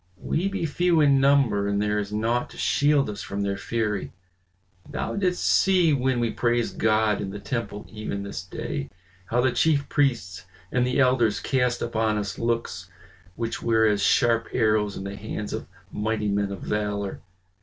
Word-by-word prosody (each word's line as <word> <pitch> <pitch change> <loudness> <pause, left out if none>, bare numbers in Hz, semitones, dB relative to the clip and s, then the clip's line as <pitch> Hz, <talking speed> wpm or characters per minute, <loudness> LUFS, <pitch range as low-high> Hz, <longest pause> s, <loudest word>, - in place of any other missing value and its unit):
We 175 - -1
be 195 -3 -2
few 170 +2 +2
in 140 -3 +5
number 135 -7 +3
and 100 0 0
there 105 0 +1
is 100 0 -4
naught 115 +3 0
to - - -13
shield 145 -1 +2
us 105 -1 -5
from 100 +1 -4
their 100 0 -1
fury. 105 -1 -2 0.8
Thou - - -3
didst 185 -3 0
see 180 -5 +4
when 130 -2 +1
we 115 -1 0
praised 120 0 0
God 110 -1 +2
in 95 - -4
the 100 - -6
temple 110 -2 -4
even 105 -2 -5
this 100 - -5
day, 70 0 -5 0.4
how 120 +5 +1
the 130 0 +2
chief 145 +1 +2
priests 105 - 0 0.3
and 125 0 +2
the 125 - 0
elders 125 -5 +3
cast 125 -2 0
upon 110 -2 0
us 100 -1 -4
looks 115 0 -2 0.5
which 115 -1 -3
were 110 -1 +3
as 105 -2 +2
sharp 115 +1 +3
arrows 110 -3 +1
in - - -5
the 100 +1 -5
hands 105 +1 -5
of - - -5 0.2
mighty 105 0 -1
men 100 0 0
of 100 - -6
valor. 105 -1 -2
115 Hz, 175 wpm, -25 LUFS, 105-130 Hz, 0.8 s, in